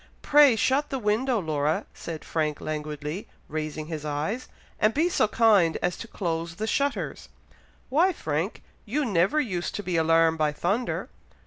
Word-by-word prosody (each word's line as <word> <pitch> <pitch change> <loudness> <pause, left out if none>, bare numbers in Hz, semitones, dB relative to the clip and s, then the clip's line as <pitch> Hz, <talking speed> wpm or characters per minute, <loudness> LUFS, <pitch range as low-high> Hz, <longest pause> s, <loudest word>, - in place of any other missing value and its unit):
"Pray 290 -4 +6
shut 270 +6 +1
the 270 - -2
window, 235 +3 +1
Laura," 155 -3 0
said 165 -2 -7
Frank 155 -2 -1
languidly, 150 +3 -4 0.2
raising 155 0 -4
his 155 -2 -5
eyes; 155 - -2 0.3
"and 215 +1 +3
be 325 +4 +3
so 275 - +2
kind 205 -7 +4
as 180 0 +1
to 230 - -8
close 170 -4 -3
the 215 - -3
shutters!" 280 +5 -1 0.6
"Why, 330 +8 +4
Frank? 160 - -3 0.2
you 285 +7 -1
never 195 - +2
used 185 -11 -2
to 205 - -4
be 180 -2 -1
alarmed 165 0 +3
by 150 -1 +2
thunder!" 200 +11 -1
180 Hz, 155 wpm, -26 LUFS, 155-240 Hz, 0.6 s, Pray